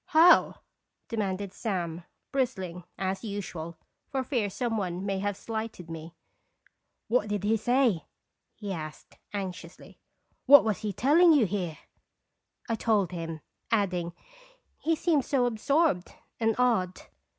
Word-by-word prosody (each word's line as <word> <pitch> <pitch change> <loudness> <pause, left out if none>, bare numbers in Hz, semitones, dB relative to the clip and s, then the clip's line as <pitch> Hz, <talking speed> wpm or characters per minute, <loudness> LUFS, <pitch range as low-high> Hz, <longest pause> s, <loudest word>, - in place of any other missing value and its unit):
"How?" 335 +3 +6 0.5
demanded 200 -3 -2
Sam, 175 -6 -3 0.3
bristling, 190 -10 -2
as 190 +1 -2
usual, 180 -6 -5 0.3
for 265 -2 -1
fear 240 -6 0
some 235 +3 -2
one 185 -2 -2
may 195 -1 -1
have 205 0 -2
slighted 220 -6 -5
me. 165 +1 -8 0.9
"What 225 -2 +2
did 205 -1 -2
he 215 +2 +3
say?" 235 - +2 0.5
he 205 -3 -5
asked, 155 -4 -8
anxiously. 185 -4 -7 0.2
" - - -45
What 285 +2 +10
was 215 -3 0
he 215 -2 -2
telling 310 - +5
you 275 -7 +5
here 180 -5 -3 0.5
?" - - -38
I 230 - 0
told 215 -4 +1
him, 165 -3 -5 0.3
adding: 180 -6 0 0.3
" - - -33
He 325 +1 +3
seems 310 -4 +1
so 260 -3 +2
absorbed 245 - +1 0.3
and 225 -1 +2
odd." 225 -8 +1
205 Hz, 140 wpm, -28 LUFS, 180-245 Hz, 0.9 s, What